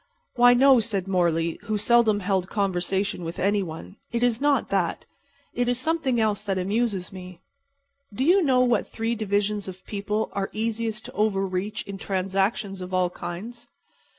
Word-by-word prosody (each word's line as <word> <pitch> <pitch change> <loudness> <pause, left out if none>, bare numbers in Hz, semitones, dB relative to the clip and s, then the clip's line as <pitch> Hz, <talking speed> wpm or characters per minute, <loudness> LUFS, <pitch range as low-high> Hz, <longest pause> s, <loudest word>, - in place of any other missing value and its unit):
"Why, 245 0 +6
no," 265 0 +6
said 205 -4 -2
Morley, 170 -3 +1
who 215 0 -1
seldom 215 -1 +3
held 190 -1 0
conversation 195 -1 -1
with 165 +1 -5
any 205 +1 +1
one. 170 +3 -8
"It 235 0 -1
is 245 0 +1
not 290 -1 +2
that. - - -1 0.5
It 245 0 0
is 245 - +1
something 295 -4 0
else 215 -2 +1
that 200 -2 -2
amuses 200 0 -1
me. 180 -2 -10 0.7
Do 235 +6 -2
you 360 +7 +5
know 260 -6 +3
what 245 -3 +2
three 225 +1 -2
divisions 205 -2 -1
of 185 0 -9
people 210 +1 -2
are 195 -1 -2
easiest 220 0 -2
to - - -7
over 205 -2 +1
reach 195 +3 -3
in 195 -1 -8
transactions 195 +1 -1
of 180 0 -4
all 180 -1 +2
kinds?" 230 +9 -7
205 Hz, 170 wpm, -25 LUFS, 190-235 Hz, 0.7 s, Why